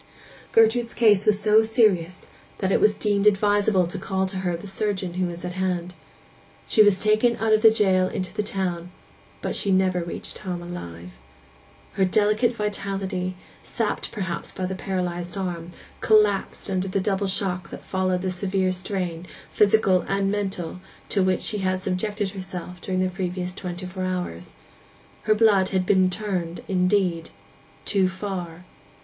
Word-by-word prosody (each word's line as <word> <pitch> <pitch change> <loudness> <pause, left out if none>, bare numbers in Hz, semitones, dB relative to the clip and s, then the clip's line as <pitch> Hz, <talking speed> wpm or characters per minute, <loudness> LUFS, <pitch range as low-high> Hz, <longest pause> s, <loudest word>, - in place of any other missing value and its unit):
Gertrude's 230 +1 +3
case 210 -4 +4
was 210 -1 +4
so 215 +1 +5
serious 210 -6 +1 0.3
that 190 -1 -1
it - - +3
was 210 0 +4
deemed 205 -1 +1
advisable 205 -2 +3
to 175 - -5
call 190 -1 -1
to 190 0 -4
her 180 -2 -1
the 170 - -11
surgeon 195 -2 -2
who 185 0 0
was 175 0 -7
at 180 - -3
hand. 180 -1 -2 0.7
She 220 - +4
was 205 -3 +5
taken 215 +3 +3
out 220 -1 +2
of 215 - +4
the 225 - +9
jail 190 -4 +3
into 185 0 -4
the 210 - -1
town; 180 -4 -3 0.5
but - - -2
she 200 - -1
never 185 -1 +2
reached 170 - -6
home 180 -2 -5
alive. 90 - -8 0.8
Her 195 - +1
delicate 215 +5 +2
vitality, 195 -3 -3 0.3
sapped - - -3
perhaps 185 -6 -4
by 185 - -4
the 185 - -3
paralyzed 180 -2 -3
arm, 175 -3 -4 0.3
collapsed 210 -2 +2
under 190 -1 -1
the 195 +1 -1
double 195 0 0
shock 185 -2 -1
that - - -9
followed 185 -1 -1
the 185 - 0
severe 185 0 0
strain, 180 -2 -3 0.2
physical 200 -3 +4
and 195 0 0
mental, 190 -4 -3 0.3
to 200 - +1
which 185 -1 +1
she 210 - -1
had 185 -1 0
subjected 195 +2 -2
herself 185 -2 -7
during 185 -1 -1
the 185 - +1
previous 180 -1 -3
twenty 180 -1 -6
four 185 0 -4
hours. 180 - -4 0.7
Her 215 0 +4
blood 210 -4 +4
had 185 -1 0
been 185 -1 +4
'turned' 185 -4 -3
indeed—too 185 0 -1
far. 185 -3 -6
190 Hz, 160 wpm, -24 LUFS, 180-205 Hz, 0.8 s, the